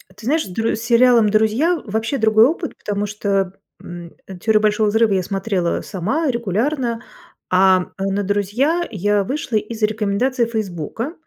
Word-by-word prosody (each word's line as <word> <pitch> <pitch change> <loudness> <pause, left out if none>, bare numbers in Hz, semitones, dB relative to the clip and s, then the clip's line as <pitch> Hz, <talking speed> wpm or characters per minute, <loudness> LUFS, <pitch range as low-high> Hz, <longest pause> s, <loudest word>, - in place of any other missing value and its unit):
Ты 210 - -13
знаешь, 310 +5 +1
с - - -9
Др 225 +5 -1
с 220 - -7
сериалом 235 -2 +4
"Друзья" 225 - +2
вообще 225 +5 -2
другой 220 0 +5
опыт, 325 +4 -2
потому 205 0 -3
что, 200 -2 -1 0.3
м, 175 -1 -9 0.3
"Теорию 215 +1 +2
Большого 215 0 +2
взрыва" 220 0 +2
я 185 -1 +1
смотрела 195 -2 -2
сама 240 - -2
регулярно, 235 +2 -1 0.5
а 185 0 +4
на 195 +1 -1
"Друзей" 210 - 0
я 205 0 +1
вышла 250 -1 -2
из 220 +1 -5
рекомендации 220 +4 0
"Фейсбука", 220 - -4
215 Hz, 150 wpm, -19 LUFS, 200-235 Hz, 0.5 s, другой